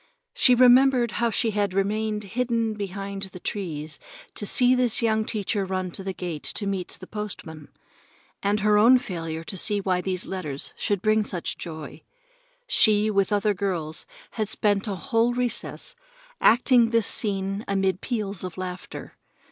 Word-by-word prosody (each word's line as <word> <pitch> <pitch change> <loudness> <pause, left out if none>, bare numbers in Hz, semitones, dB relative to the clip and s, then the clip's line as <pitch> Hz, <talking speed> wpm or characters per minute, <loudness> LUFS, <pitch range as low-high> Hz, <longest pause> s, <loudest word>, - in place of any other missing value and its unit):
She 250 - +4
remembered 250 -1 +5
how 235 - +3
she 225 +1 0
had 205 -2 -1
hidden 215 +3 -1
behind 200 -1 -6
the 190 -1 -7
trees 160 -7 -5 0.3
to 205 - -3
see 250 +2 +6
this 250 -2 +2
young 220 -1 +1
teacher 205 -1 -1
run 185 -1 -3
to 195 - -2
the 190 - -3
gate 175 -5 -5
to 205 - -3
meet 190 -2 -4
the 185 - -9
postman, 180 -8 -7 0.7
and 205 +1 0
her 210 0 +4
own 240 +4 +7
failure 165 -7 -5
to 180 - -6
see 205 +3 +3
why 185 -2 0
these 185 0 -2
letters 155 -8 -2
should 200 -3 -2
bring 215 0 +3
such 180 -4 -3
joy. 160 -3 -8 0.6
She, 215 - +3
with 195 -1 +1
other 205 0 +2
girls, 175 -5 -3 0.2
had 215 -2 -3
spent 205 -1 +1
a 200 - -2
whole 235 +2 0
recess 250 -1 -3 0.5
acting 240 0 +5
this 230 -2 +2
scene 195 -1 -1
amid 195 -2 0
peals 210 -7 -3
of 185 -1 -6
laughter. 185 -1 -7
205 Hz, 155 wpm, -25 LUFS, 185-220 Hz, 0.7 s, own